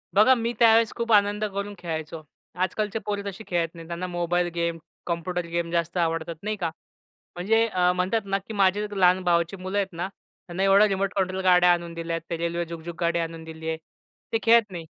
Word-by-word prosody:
बघा, 215 Hz, +6 st, +7 dB
मी 235 Hz, 0 st, -2 dB
त्यावेळेस 225 Hz, -1 st, +5 dB
खूप 235 Hz, -1 st, -2 dB
आनंद 205 Hz, 0 st, +3 dB
करून 200 Hz, 0 st, -4 dB
खेळायचो. 160 Hz, -2 st, -5 dB, 0.3 s
आजकालचे 205 Hz, +4 st, -1 dB
पोरं 205 Hz, -1 st, -2 dB
तशी 200 Hz, +3 st, -9 dB
खेळत 170 Hz, -2 st, 0 dB
नाहीत. 165 Hz, -1 st, -10 dB
त्यांना 175 Hz, +2 st, -4 dB
मोबाईल 175 Hz, 0 st, 0 dB
गेम, 170 Hz, 0 st, -1 dB, 0.3 s
कॉम्प्युटर 175 Hz, +1 st, -2 dB
गेम 170 Hz, 0 st, -3 dB
जास्त 170 Hz, +1 st, -1 dB
आवडतात, 165 Hz, -1 st, -1 dB
नाही 215 Hz, +1 st, -1 dB
का? 175 Hz, -4 st, -1 dB, 0.7 s
म्हणजे 220 Hz, +6 st, +2 dB
अ, 180 Hz, -4 st, +2 dB
म्हणतात 185 Hz, +5 st, +1 dB
ना, 195 Hz, 0 st, 0 dB
की 200 Hz, +3 st, -9 dB
माझे 200 Hz, +1 st, +2 dB
लहान 185 Hz, -1 st, +4 dB
भावाची 170 Hz, 0 st, +1 dB
मुलं 185 Hz, +2 st, -4 dB
आहेत 195 Hz, -2 st, -1 dB
ना. 170 Hz, +2 st, -3 dB, 0.4 s
त्यांना 180 Hz, +2 st, -2 dB
एवढ्या 195 Hz, +2 st, +6 dB
रिमोट 195 Hz, -1 st, -1 dB
कंट्रोल 190 Hz, -1 st, 0 dB
गाड्या 180 Hz, -1 st, +6 dB
आणून 170 Hz, -1 st, -4 dB
दिल्यात. 165 Hz, 0 st, -3 dB
ते 170 Hz, -, -2 dB
रेल्वे 170 Hz, +1 st, -2 dB
झुकझुक 170 Hz, 0 st, -7 dB
गाडी 170 Hz, 0 st, +1 dB
आणून 165 Hz, 0 st, -4 dB
दिलीये. 160 Hz, 0 st, -5 dB, 0.6 s
ते -, -, +4 dB
खेळत 230 Hz, -3 st, +5 dB
नाही. 170 Hz, -3 st, -6 dB
180 Hz, 190 wpm, -25 LUFS, 170-200 Hz, 0.7 s, बघा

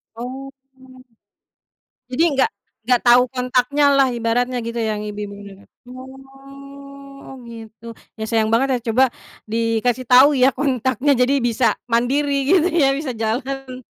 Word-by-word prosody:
Oh. 255 Hz, +3 st, -7 dB, 1.6 s
Jadi, 255 Hz, +6 st, 0 dB
nggak 265 Hz, -, +2 dB, 0.3 s
nggak 245 Hz, 0 st, +2 dB
tahu 245 Hz, +1 st, +6 dB
kontaknya 255 Hz, +3 st, 0 dB
lah, 275 Hz, -1 st, +4 dB
ibaratnya 240 Hz, +2 st, -1 dB
gitu 230 Hz, +1 st, -6 dB
yang 220 Hz, -2 st, -2 dB
ibu-ibu 205 Hz, -1 st, -6 dB
PKK, 200 Hz, +4 st, -16 dB, 1.4 s
oh, 270 Hz, -, -11 dB
gitu. 225 Hz, 0 st, -12 dB, 0.3 s
Ya, -, -, -2 dB
sayang 220 Hz, -1 st, 0 dB
banget 265 Hz, +4 st, +2 dB
ya, -, -, -3 dB
coba 260 Hz, +3 st, +4 dB, 0.4 s
dikasih 230 Hz, +3 st, -1 dB
tahu, 255 Hz, +3 st, +8 dB
ya, 260 Hz, +1 st, +4 dB
kontaknya, 260 Hz, 0 st, 0 dB
jadi 250 Hz, +3 st, +2 dB
bisa, 235 Hz, 0 st, 0 dB, 0.2 s
mandiri 270 Hz, +5 st, 0 dB, 0.2 s
gitu, 360 Hz, -2 st, +4 dB
ya, 295 Hz, -6 st, +2 dB
bisa 275 Hz, -2 st, -4 dB
jalan, 255 Hz, +3 st, -4 dB
250 Hz, 130 wpm, -19 LUFS, 230-270 Hz, 1.6 s, tahu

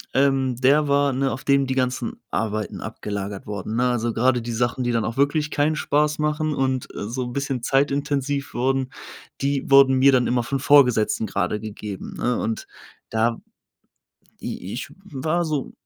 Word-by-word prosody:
ähm, 135 Hz, -2 st, +2 dB
der 140 Hz, +4 st, +3 dB
war, 140 Hz, 0 st, +2 dB
ne, 135 Hz, +1 st, 0 dB
auf 120 Hz, +3 st, -5 dB
dem 140 Hz, -1 st, +3 dB
die 130 Hz, -, -1 dB
ganzen 125 Hz, -2 st, -1 dB, 0.2 s
Arbeiten 110 Hz, -1 st, -2 dB
abgelagert 100 Hz, -1 st, -5 dB
wurden, 105 Hz, +1 st, -5 dB
ne? 125 Hz, -, +2 dB
Also 120 Hz, -1 st, -1 dB
grade 125 Hz, +2 st, +2 dB
die 120 Hz, +1 st, -5 dB
Sachen, 120 Hz, +2 st, -1 dB
die 120 Hz, -, 0 dB
dann 115 Hz, -2 st, 0 dB
auch 115 Hz, -, -3 dB
wirklich 150 Hz, +2 st, +1 dB
keinen 150 Hz, +2 st, +1 dB
Spaß 150 Hz, 0 st, +1 dB
machen 150 Hz, 0 st, 0 dB
und, 130 Hz, -1 st, 0 dB
äh, -, -, -4 dB
so 125 Hz, +3 st, -3 dB
'n 120 Hz, -, -6 dB
bisschen 135 Hz, -3 st, -2 dB
zeitintensiv 140 Hz, +1 st, 0 dB
wurden, 130 Hz, +1 st, 0 dB, 0.5 s
die 140 Hz, 0 st, -1 dB
wurden 135 Hz, -1 st, +6 dB
mir 140 Hz, +1 st, +6 dB
dann 125 Hz, -2 st, +3 dB
immer 120 Hz, 0 st, +1 dB
von 135 Hz, +3 st, -2 dB
Vorgesetzten 125 Hz, -6 st, +4 dB
grade 100 Hz, +1 st, -1 dB
gegeben, 105 Hz, -2 st, -7 dB
ne? 125 Hz, 0 st, 0 dB
Und 110 Hz, 0 st, -3 dB, 0.5 s
da 115 Hz, +1 st, +1 dB, 1.1 s
i 95 Hz, -, -5 dB
ich 130 Hz, +3 st, -5 dB
w -, -, -15 dB, 0.3 s
war 170 Hz, +2 st, +1 dB
so 150 Hz, -4 st, -2 dB
130 Hz, 180 wpm, -23 LUFS, 115-140 Hz, 1.1 s, wurden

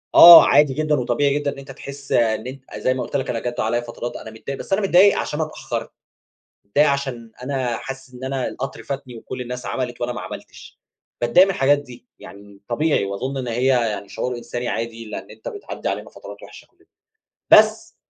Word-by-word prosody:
آه 170 Hz, 0 st, +12 dB
عادي 145 Hz, -1 st, +4 dB
جدًا، 155 Hz, +1 st, +1 dB
وطبيعي 140 Hz, +4 st, +1 dB
جدّا، 145 Hz, -1 st, -2 dB
إن -, -, -15 dB
أنت 135 Hz, 0 st, -10 dB
تحس 140 Hz, +1 st, -10 dB
إن 110 Hz, 0 st, +1 dB
أنت 135 Hz, +1 st, -9 dB
أ -, -, -8 dB
زي 130 Hz, -, +1 dB
ما 130 Hz, -, -3 dB
قُلت -, -, -7 dB
لَك 135 Hz, 0 st, -1 dB
أنا 115 Hz, -, -1 dB
جاتّ 120 Hz, +1 st, -5 dB
عليَّ 120 Hz, +2 st, 0 dB
فترات 120 Hz, 0 st, -7 dB
أنا 110 Hz, -, -8 dB
متضايق، 125 Hz, +5 st, -7 dB
بس 195 Hz, -, -4 dB
أنا 200 Hz, -, +2 dB
متضايق 195 Hz, +1 st, +5 dB
عشان 150 Hz, -, -3 dB
أنا 155 Hz, -, 0 dB
اتأخرت، -, -, -5 dB, 0.8 s
متضايق 145 Hz, +9 st, +3 dB
عشان 130 Hz, -5 st, -3 dB
أنا 130 Hz, -3 st, -2 dB
حاسِس 135 Hz, 0 st, -9 dB
إن 125 Hz, +1 st, -8 dB
أنا 130 Hz, -1 st, -2 dB
القطر 135 Hz, +1 st, -6 dB
فاتني، 135 Hz, -3 st, -6 dB
وكُلّ 125 Hz, +3 st, -8 dB
الناس 125 Hz, 0 st, -6 dB
عملت 125 Hz, -2 st, -4 dB
وأنا 120 Hz, 0 st, -1 dB
ما 120 Hz, -, -6 dB
عملتش، -, -, -11 dB, 0.4 s
باتضايق 120 Hz, +11 st, +5 dB
من 195 Hz, -, 0 dB
الحاجات 140 Hz, 0 st, +3 dB
دي 125 Hz, -3 st, -12 dB
يعني 100 Hz, 0 st, -14 dB
طبيعي، 150 Hz, 0 st, +1 dB
وأظن 115 Hz, +8 st, -4 dB
إن 125 Hz, -2 st, -3 dB
هي 120 Hz, +3 st, -1 dB
يعني 115 Hz, -6 st, +1 dB
شعور 125 Hz, -1 st, -3 dB
إنساني 120 Hz, 0 st, -5 dB
عادي. 115 Hz, 0 st, -4 dB
لأن 110 Hz, -, -8 dB
أنت -, -, -9 dB
بتعدّي 415 Hz, -4 st, -6 dB
علينا -, -, -4 dB
فترات -, -, -12 dB
وِحشّة -, -, -13 dB
كُلّنا. -, -, -32 dB, 0.7 s
بس، -, -, +5 dB
130 Hz, 205 wpm, -21 LUFS, 120-140 Hz, 0.8 s, آه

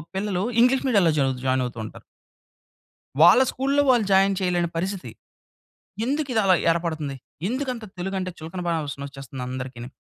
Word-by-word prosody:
పిల్లలు 190 Hz, -1 st, -1 dB, 0.2 s
English 255 Hz, +2 st, +4 dB
మీడియాల్లో 200 Hz, -9 st, +4 dB
Joy 135 Hz, -2 st, +2 dB
join 130 Hz, 0 st, +2 dB
అవుతూ 120 Hz, -1 st, -7 dB
ఉంటారు. -, -, -11 dB, 1.2 s
వాళ్ళ 245 Hz, -, +8 dB
స్కూల్‌లో 275 Hz, +2 st, +1 dB
వాళ్ళు 240 Hz, -4 st, +4 dB
జాయిన్ 195 Hz, +1 st, +4 dB
చేయలేని 175 Hz, -2 st, +1 dB
పరిస్థితి. 185 Hz, +2 st, -3 dB, 0.9 s
ఎందుకు 285 Hz, +3 st, -1 dB
ఇది 225 Hz, -, +3 dB
అలా 190 Hz, -1 st, +5 dB, 0.2 s
ఏర్పడుతుంది? 160 Hz, -4 st, -2 dB, 0.3 s
ఎందుకంత 255 Hz, -1 st, -3 dB
తెలుగు 190 Hz, +2 st, -3 dB
అంటే 185 Hz, -1 st, -3 dB
చులకన 165 Hz, +3 st, -7 dB
భావన 155 Hz, -4 st, -2 dB
వచ్చేస్తుంది 135 Hz, -2 st, -9 dB
అందరికిని. 125 Hz, -2 st, -6 dB
180 Hz, 145 wpm, -24 LUFS, 140-220 Hz, 1.2 s, వాళ్ళ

